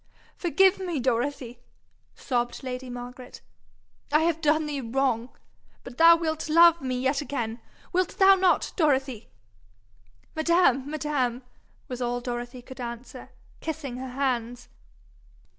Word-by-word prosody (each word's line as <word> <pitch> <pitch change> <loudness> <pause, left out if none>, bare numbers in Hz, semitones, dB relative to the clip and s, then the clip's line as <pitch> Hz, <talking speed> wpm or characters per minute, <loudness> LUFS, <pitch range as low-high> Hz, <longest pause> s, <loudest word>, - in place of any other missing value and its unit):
'Forgive 380 +2 +3
me, 350 -6 -3
Dorothy,' 245 0 -2 0.6
sobbed 245 0 -2
lady 255 0 -5
Margaret. 245 +1 -9 0.7
'I 305 +1 +4
have 325 0 0
done 310 0 +2
thee 290 -2 -3
wrong. 245 -1 -1 0.5
But 245 0 -11
thou 335 +1 +9
wilt 315 -2 -3
love 335 +1 +6
me 255 -1 -2
yet 265 +3 0
again 240 -5 -4 0.3
wilt 365 -1 0
thou 390 0 +7
not, 375 -1 +2
Dorothy?' 270 - 0 1.1
'Madam! 315 -5 +2
madam 275 -5 -2 0.2
!' - - -36
was 250 -3 -6
all 245 0 -1
Dorothy 245 0 -6
could 260 0 -10
answer, 235 +1 -8 0.3
kissing 295 -6 -5
her 260 0 -6
hands. 245 -3 -2
265 Hz, 125 wpm, -26 LUFS, 245-315 Hz, 1.1 s, thou